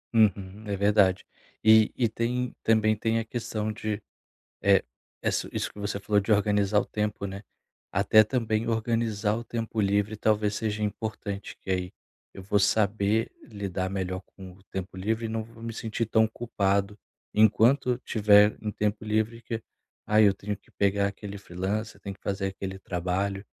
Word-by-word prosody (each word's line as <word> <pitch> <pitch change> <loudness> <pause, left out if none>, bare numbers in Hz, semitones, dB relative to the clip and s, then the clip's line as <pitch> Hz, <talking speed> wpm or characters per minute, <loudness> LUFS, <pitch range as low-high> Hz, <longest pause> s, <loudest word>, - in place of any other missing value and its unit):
Uhum. 100 -1 +2
É 100 - -1
verdade. 100 -2 +3 0.4
E 110 0 +6
e 120 - +3
tem 120 +2 -2
também 110 -1 +3
tem 115 +1 0
a 115 - -1
questão 110 -2 -3
de 105 0 -3 0.6
é, 100 -1 +5 0.4
ess - - 0
isso - - -2
que - - -13
você 100 0 -2
falou 105 +1 +2
de 100 - -6
organizar 105 0 +3
o - - -2
tempo, 105 -1 -2
né, 100 0 -6 0.5
até 100 +3 +5
também 110 -1 0
organizar 115 -2 0
o 120 - -5
tempo 115 -1 -3
livre, 105 +1 +1
talvez 105 -1 +1
seja 105 -1 -2
importante 105 -1 -4
que 95 - -4
aí 90 0 -2 0.4
eu 95 - -9
vou 100 +1 +2
saber 105 +2 +2
lidar 100 -4 -4
melhor 95 -1 -3
com 95 -1 -10
o 95 +1 -21
tempo 95 -1 -6
livre 110 +4 -1
e - - -3
não 110 0 -2
vou 115 +1 -14
me 115 - -3
sentir 115 +1 -2
tão 110 0 +3
culpado 100 -3 -1 0.3
enquanto 120 +4 +4
tiver 105 -2 +4
um 105 -1 -2
tempo 105 +1 -2
livre, 110 +2 0
que 115 -1 -4 0.4
aí 105 0 +5
eu 100 - +5
tenho 100 +1 -5
que - - -29
pegar 100 0 +2
aquele 100 0 -7
freelancer, 100 +4 -4
tenho 100 - -5
que 100 - -28
fazer 95 0 -2
aquele 95 0 -5
trabalho, 95 +2 -2
105 Hz, 170 wpm, -27 LUFS, 100-110 Hz, 0.6 s, E